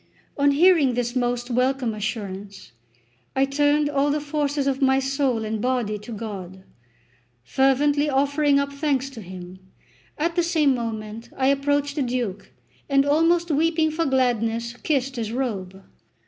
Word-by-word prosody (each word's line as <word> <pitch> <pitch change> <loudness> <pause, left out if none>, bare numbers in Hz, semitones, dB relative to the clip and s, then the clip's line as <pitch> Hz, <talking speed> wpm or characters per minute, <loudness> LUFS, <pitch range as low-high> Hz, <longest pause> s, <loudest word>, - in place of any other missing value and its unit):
On 285 0 +3
hearing 295 -3 +4
this 240 0 -2
most 245 0 -1
welcome 255 -1 +1
assurance, 200 - -6 0.6
I 270 - +3
turned 290 +2 +2
all 285 0 +1
the 295 +1 +1
forces 290 -1 -1
of 275 0 -1
my 265 0 +4
soul 270 -4 0
and 215 0 -3
body 240 -4 -1
to 210 +3 -10
God, 195 -4 -7 0.8
fervently 285 - +2
offering 285 +1 +2
up 280 0 -1
thanks 280 -2 -1
to 230 - -9
Him. 185 -1 -10 0.6
At 335 +2 -1
the 350 - +3
same 320 -5 +2
moment 225 -1 -5
I 265 0 +2
approached 285 +1 0
the - - +1
Duke, 240 -6 -3 0.4
and 275 0 +3
almost 330 +3 +2
weeping 320 +1 +2
for 325 0 -1
gladness, 235 -3 0
kissed 270 -3 -1
his 225 -2 -3
robe. 195 -7 -4
265 Hz, 150 wpm, -23 LUFS, 230-290 Hz, 0.8 s, hearing